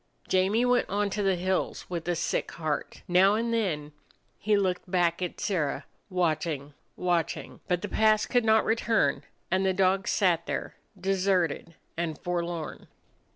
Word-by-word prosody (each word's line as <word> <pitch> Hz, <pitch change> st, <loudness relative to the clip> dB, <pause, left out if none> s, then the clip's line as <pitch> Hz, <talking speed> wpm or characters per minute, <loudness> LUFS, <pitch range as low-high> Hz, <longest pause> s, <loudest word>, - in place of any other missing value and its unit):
Jamie 195 Hz, +6 st, +2 dB
went 245 Hz, 0 st, +2 dB
on 205 Hz, +1 st, 0 dB
to 205 Hz, -, -1 dB
the 195 Hz, -2 st, +2 dB
hills 185 Hz, +1 st, -1 dB
with 170 Hz, -2 st, -5 dB
a 175 Hz, -, +1 dB
sick -, -, -1 dB
heart. 155 Hz, -3 st, -3 dB
Now 190 Hz, +3 st, +5 dB
and 230 Hz, +1 st, -1 dB
then 160 Hz, -10 st, -1 dB, 0.5 s
he 210 Hz, 0 st, +2 dB
looked 185 Hz, -2 st, -1 dB
back 175 Hz, -1 st, +1 dB
at 180 Hz, -, -3 dB
Sirrah, 180 Hz, -9 st, -1 dB, 0.2 s
watching, 155 Hz, -5 st, -1 dB, 0.2 s
watching. 175 Hz, -2 st, -1 dB
But 180 Hz, +1 st, 0 dB
the -, -, -1 dB
past 215 Hz, 0 st, +3 dB
could 245 Hz, -2 st, +3 dB
not 220 Hz, 0 st, +4 dB
return, 225 Hz, 0 st, +2 dB, 0.3 s
and 190 Hz, +1 st, +2 dB
the 190 Hz, 0 st, +2 dB
dog 190 Hz, +1 st, +2 dB
sat 175 Hz, -4 st, +2 dB
there, -, -, -3 dB, 0.3 s
deserted 185 Hz, -4 st, 0 dB, 0.2 s
and 165 Hz, -2 st, -2 dB
forlorn. 175 Hz, -2 st, -4 dB
185 Hz, 155 wpm, -28 LUFS, 170-205 Hz, 0.5 s, Now